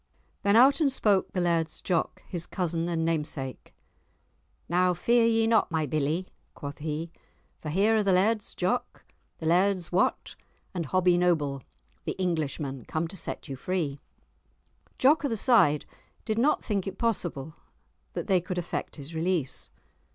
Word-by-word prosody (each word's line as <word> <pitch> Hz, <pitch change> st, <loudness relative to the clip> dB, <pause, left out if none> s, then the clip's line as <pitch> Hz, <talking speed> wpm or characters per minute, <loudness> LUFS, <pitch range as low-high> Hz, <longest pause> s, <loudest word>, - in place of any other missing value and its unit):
Then 200 Hz, +1 st, +3 dB
out 270 Hz, +5 st, +6 dB
and 285 Hz, -3 st, +3 dB
spoke 205 Hz, -7 st, +2 dB
the 185 Hz, -, -2 dB
Laird's 170 Hz, -3 st, 0 dB
Jock, 175 Hz, -3 st, -1 dB
his 175 Hz, -2 st, -4 dB
cousin 170 Hz, -2 st, -1 dB
and 165 Hz, -1 st, 0 dB
namesake, 150 Hz, -5 st, -3 dB, 1.0 s
"Now 180 Hz, +1 st, +2 dB
fear 235 Hz, +6 st, +3 dB
ye 225 Hz, -1 st, +3 dB
not, 225 Hz, -1 st, +3 dB
my 160 Hz, -2 st, 0 dB
billie!" 155 Hz, +5 st, -1 dB, 0.3 s
quoth 145 Hz, 0 st, -7 dB
he; 155 Hz, +2 st, -4 dB, 0.5 s
"for 155 Hz, -, -6 dB
here 200 Hz, +8 st, +3 dB
are -, -, +3 dB
the 200 Hz, -2 st, +2 dB
Laird's 205 Hz, +4 st, +1 dB
Jock, 240 Hz, +7 st, -2 dB, 0.3 s
the 160 Hz, -, -7 dB
Laird's 180 Hz, 0 st, +2 dB
Wat, 180 Hz, +2 st, +1 dB, 0.4 s
and 170 Hz, -5 st, -3 dB
Hobbie 180 Hz, +2 st, +3 dB
Noble 150 Hz, -6 st, +1 dB, 0.4 s
the -, -, -1 dB
Englishman 150 Hz, -7 st, -2 dB
come 160 Hz, +1 st, -2 dB
to 195 Hz, -, -9 dB
set 185 Hz, -, -5 dB
you 135 Hz, -, -5 dB
free." 150 Hz, -2 st, -2 dB, 1.0 s
Jock 295 Hz, +5 st, +4 dB
o' -, -, +2 dB
the 225 Hz, -, -1 dB
Side 195 Hz, -, +4 dB, 0.4 s
did 220 Hz, -1 st, 0 dB
not 285 Hz, +6 st, +2 dB
think 200 Hz, -3 st, -1 dB
it 195 Hz, -, -5 dB
possible 175 Hz, -, -2 dB, 0.6 s
that -, -, -3 dB
they 190 Hz, -3 st, +3 dB
could 180 Hz, +1 st, -5 dB
effect 175 Hz, -1 st, -3 dB
his 150 Hz, +2 st, -8 dB
release. 165 Hz, -4 st, -1 dB
175 Hz, 160 wpm, -28 LUFS, 155-200 Hz, 1.0 s, out